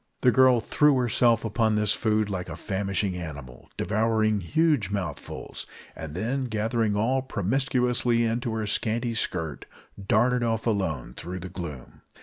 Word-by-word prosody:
The 125 - +5
girl 130 -1 +5
threw 150 +3 +3
herself 120 -1 +3
upon 110 0 +1
the 105 0 +1
food 110 0 +1
like 95 -3 -4
a - - -5
famishing 100 -1 -2
animal, 70 -8 -8
devoured 110 +1 +1
huge 145 - +1
mouthfuls, 90 -8 -5 0.3
and 80 -1 -7
then, 125 +8 -1
gathering 110 -1 0
all 125 +6 +1
promiscuously 125 0 +1
into 115 +1 -1
her 110 -1 -2
scanty 115 +3 0
skirt, 80 -8 -2 0.4
darted 120 +5 +2
off 115 -1 -1
alone 90 - -1
through 90 +5 -6
the 95 - -6
gloom. 80 -8 -8
110 Hz, 140 wpm, -26 LUFS, 95-120 Hz, 0.4 s, The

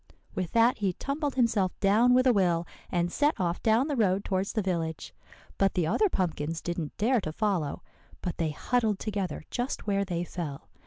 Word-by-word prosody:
With 180 -3 -3
that 230 +1 +4
he 195 -3 +1
tumbled 280 - -3
himself 225 -7 +1
down 220 +5 +4
with 255 +1 +4
a 255 - +5
will, 175 -4 +2 0.3
and 175 -1 0
set 295 - +1
off 175 -1 -1
down 225 +5 +3
the 295 - -1
road 200 -4 +2
towards 190 +1 -1
the 220 - +1
village. 165 -4 -3 0.5
But 195 -1 +2
the 175 - +2
other 415 - +2
pumpkins 165 - -1
didn't 170 -3 -4
dare 235 +2 +2
to 155 - -4
follow, 180 -6 -1 0.4
but 180 -3 -3
they 165 -2 0
huddled 220 +6 0
together 200 -4 -3
just 245 +2 -3
where 200 -1 +1
they 175 -3 -2
fell. 165 -6 -6
195 Hz, 190 wpm, -28 LUFS, 175-230 Hz, 0.5 s, a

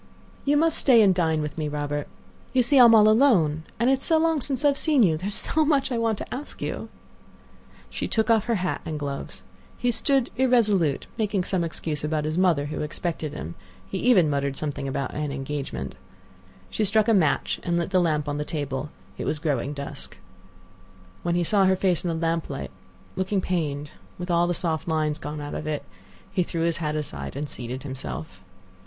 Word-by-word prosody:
"You 290 +1 +3
must 320 +1 +2
stay 235 -5 +6
and 195 -2 +5
dine 160 -3 +1
with 150 +1 -5
me, 155 - -1
Robert. 145 0 -3 0.5
You 255 -1 +4
see 270 +3 +5
I 245 - +10
am 230 -1 +8
all 215 -1 +7
alone, 195 - +4
and 235 - +2
it 265 0 +3
is - - -6
so 325 - +3
long 320 -2 +2
since 270 +1 -1
I - - +7
have 280 - -1
seen 295 -6 +4
you. 165 -5 +4
There 180 +5 -4
is 205 - -1
so 315 - +2
much 285 -3 +2
I 240 - 0
want 225 -2 +1
to - - -6
ask 285 +4 -7
you." - - -4 1.0
She - - -4
took 220 +1 +1
off 220 -2 +3
her 235 - +1
hat 185 -2 -2
and 155 -1 -4
gloves. 140 -9 -5 0.3
He 245 - +1
stood 270 +1 +1
irresolute, 210 - +3
making 205 -3 0
some 180 -1 0
excuse 155 -2 -4
about 150 0 -1
his 155 +1 -2
mother 175 -6 +3
who 150 - -4
expected 155 0 -3
him; 85 - -6 0.3
he - - -4
even 200 -10 +5
muttered 140 -1 -1
something 145 -2 -3
about 135 0 -3
an 150 -1 -3
engagement. 135 - -4 0.8
She 220 - 0
struck 215 +2 +3
a 225 - +4
match 175 -8 +2
and 170 -1 0
lit 170 +2 -2
the 185 -2 +4
lamp 155 -3 0
on 145 0 -2
the - - 0
table; 145 -2 -4 0.3
it - - -3
was 155 - -1
growing 145 -4 -1
dusk. 140 -1 -6 1.0
When 170 0 0
he 175 - +2
saw 195 +3 +3
her 190 0 +4
face 185 -2 +1
in - - -2
the 165 - -1
lamp 165 0 -1
light, - - -5 0.4
looking 190 +1 0
pained, 150 -6 -2 0.3
with 180 0 -4
all 170 0 +3
the 175 - 0
soft 160 -2 -1
lines 155 -1 0
gone 150 -1 -5
out 145 0 -6
of 150 - -5
it, 150 -1 -2 0.5
he 185 - +1
threw 170 -1 -2
his 170 -1 +1
hat 155 -2 -2
aside 75 - -5
and 145 +1 -3
seated 125 0 -6
himself. 130 - -7
165 Hz, 210 wpm, -25 LUFS, 150-215 Hz, 1.0 s, I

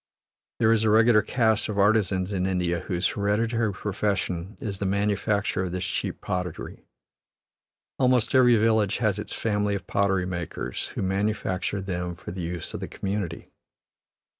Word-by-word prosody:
There 110 -1 +3
is 115 -1 +3
a 110 - +3
regular 110 0 +5
caste 110 -2 +1
of 105 - -3
artisans 100 -2 +2
in 95 -1 0
India 90 -2 0
whose 90 +2 -2
hereditary 110 +3 +1
profession 95 -2 -2
is 100 -3 -4
the 100 - -1
manufacture 100 0 0
of 90 - -5
this 90 0 -2
cheap - - -3
pottery; 90 -2 -5 1.1
almost 125 -2 +3
every 125 -2 +6
village 110 -2 +2
has 105 -4 0
its - - -5
family 105 -2 0
of 95 - -5
pottery 95 -2 +1
makers, 85 -8 -4
who - - -2
manufacture 100 0 -1
them 90 -2 -3
for 85 - -8
the 90 +1 -5
use 85 0 -3
of - - -4
the - - -5
community. 95 -4 -4
100 Hz, 155 wpm, -26 LUFS, 90-110 Hz, 1.1 s, every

